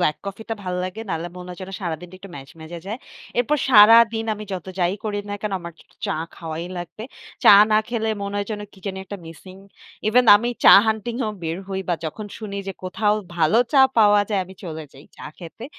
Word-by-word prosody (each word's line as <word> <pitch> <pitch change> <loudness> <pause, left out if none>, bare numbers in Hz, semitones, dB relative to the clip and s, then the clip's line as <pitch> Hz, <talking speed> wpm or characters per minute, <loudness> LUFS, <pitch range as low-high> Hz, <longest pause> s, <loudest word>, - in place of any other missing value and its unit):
black 155 -4 +1
coffee 200 +3 -7
টা - - 0
ভাল 180 -1 -4
লাগে। 185 +4 -6
না - - -2
হলে 170 +2 -5
মনে 180 0 -9
হয় 180 - -9
যেন 185 +1 -7
সারাদিনটা 175 +1 -5
একটু 195 -1 -12
ম্যাজম্যাজে 160 +4 -10
যায়। 220 +5 -4 0.4
এরপর 275 +5 +2
সারাদিন 225 +1 +7
আমি 215 0 -8
যত 185 -2 -5
যাই 175 +1 +1
করি 205 -1 -2
না - - -2
কেন 210 -2 -3
আমার 170 -1 -8
একটু - - -21
চ - - -32
চা - - -1 0.2
খাওয়াই 165 0 -6
লাগবে। 175 +5 -8 0.4
চা - - +9 0.2
না 215 - +5
খেলে 225 -2 -2
মনে 200 0 -4
হয় 205 - -2
যেন 210 -1 -4
কি 195 - -18
জানি 190 -1 -4
একটা 200 +1 -7
missing। 185 +3 -12 0.5
Even 245 +4 +4
আমি 235 +3 -2 0.2
চা - - +10
hunting 220 +2 -2
এও 215 - -2
বের 165 0 -3
হই 190 0 -3
বা 175 - +2
যখন 205 +7 -5
শুনি 210 -3 -6
যে - - -3
কোথাও 210 +3 +1 0.2
ভালো 165 +6 +3
চা 275 - +6 0.2
পাওয়া 205 -1 +6
যায় 205 -3 0
আমি 190 +1 -13
চলে 160 -2 -6
যাই 135 +2 -15
চা - - -9
খেতে। 175 +7 -10
195 Hz, 225 wpm, -22 LUFS, 175-215 Hz, 0.5 s, চা